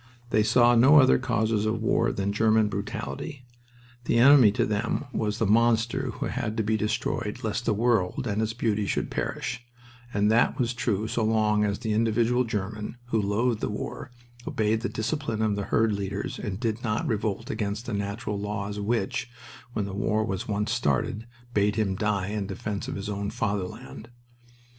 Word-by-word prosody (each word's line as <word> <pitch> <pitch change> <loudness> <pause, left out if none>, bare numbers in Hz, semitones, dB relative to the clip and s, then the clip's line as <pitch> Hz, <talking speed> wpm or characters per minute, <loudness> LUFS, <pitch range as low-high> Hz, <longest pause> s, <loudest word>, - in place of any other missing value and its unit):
They 110 - +4
saw 120 +2 +5
no 130 +6 +7
other 130 -2 +5
causes 110 -4 0
of 110 +1 0
war 110 - +2
than 100 +1 -2
German 110 0 +3
brutality. 125 +7 -5 0.6
The 115 - +2
enemy 130 -3 +7
to 115 0 +1
them 110 +6 -1
was 105 -1 -1
the 115 - +1
monster 115 +2 +2
who - - -4
had 110 +1 -3
to 110 - +1
be 110 +1 +1
destroyed 110 +1 -2
lest 110 +2 -2
the - - +2
world 115 +1 +1
and 105 -2 -1
its 110 0 -1
beauty 110 -3 0
should - - -1
perish 115 -1 -3 0.5
and 105 0 +2
that 115 +2 +3
was 125 -3 0
true 110 -3 -1
so 115 0 -1
long 110 -1 +2
as 100 -1 0
the 110 -2 -2
individual 115 +3 +2
German, 105 +1 -4
who 110 -3 +2
loathed 105 +3 0
the - - -1
war, - - -5 0.4
obeyed 110 +1 0
the 120 - -2
discipline 115 -2 -2
of 105 -2 +1
the 100 -1 -3
herd 110 -1 +2
leaders 100 0 -4
and 100 -1 -4
did 115 -1 -2
not 110 -2 -1
revolt 110 0 -2
against 105 +2 -3
the 120 - -4
natural 100 +1 -3
laws 105 0 -4
which, 110 +1 -1 0.4
when 105 - -1
the 100 - -6
war 105 +2 0
had 95 -2 -3
once 105 +1 -1
started, 110 - 0 0.3
bade 105 -1 +2
him 100 -3 0
die 100 -1 -1
in 105 -2 -3
defense 100 +1 -4
of - - -4
his 100 +1 -5
own 100 -1 -3
Fatherland. 105 +3 -4
110 Hz, 180 wpm, -26 LUFS, 105-115 Hz, 0.6 s, no